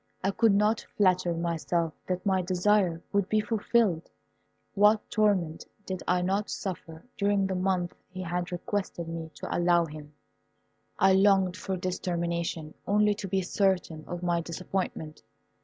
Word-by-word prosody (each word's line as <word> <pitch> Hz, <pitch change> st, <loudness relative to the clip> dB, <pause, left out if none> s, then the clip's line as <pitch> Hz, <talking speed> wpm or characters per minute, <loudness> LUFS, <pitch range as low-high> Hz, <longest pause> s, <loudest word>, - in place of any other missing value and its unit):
I 195 Hz, -, +2 dB
could 225 Hz, 0 st, +3 dB
not 210 Hz, +2 st, +2 dB
flatter 185 Hz, -3 st, +3 dB
myself 170 Hz, -1 st, -1 dB
that 185 Hz, +2 st, -2 dB
my 190 Hz, -2 st, +2 dB
desire 180 Hz, -1 st, +1 dB
would 200 Hz, -1 st, +1 dB
be 215 Hz, -, +3 dB
fulfilled. 215 Hz, -5 st, +1 dB, 0.6 s
What 210 Hz, +1 st, +4 dB
torment 195 Hz, -7 st, +1 dB, 0.2 s
did 185 Hz, -1 st, -4 dB
I 180 Hz, 0 st, +2 dB
not 195 Hz, +3 st, 0 dB
suffer 165 Hz, -4 st, -6 dB
during 200 Hz, -1 st, +2 dB
the 190 Hz, -, -1 dB
month 185 Hz, -1 st, 0 dB, 0.2 s
he 185 Hz, 0 st, -6 dB
had 175 Hz, 0 st, -3 dB
requested 180 Hz, -2 st, -3 dB
me 165 Hz, -1 st, -5 dB
to -, -, -4 dB
allow 175 Hz, -1 st, +3 dB
him. 150 Hz, -1 st, -11 dB, 0.8 s
I 190 Hz, 0 st, +5 dB
longed 190 Hz, -2 st, +4 dB
for 195 Hz, -2 st, -3 dB
its 185 Hz, 0 st, -3 dB
termination 170 Hz, -3 st, -2 dB
only 210 Hz, +1 st, +3 dB
to 205 Hz, -1 st, -6 dB
be 190 Hz, 0 st, 0 dB
certain 180 Hz, -4 st, 0 dB
of 175 Hz, 0 st, -5 dB
my 170 Hz, -1 st, +1 dB
disappointment. 170 Hz, -2 st, -4 dB
185 Hz, 150 wpm, -28 LUFS, 170-200 Hz, 0.8 s, I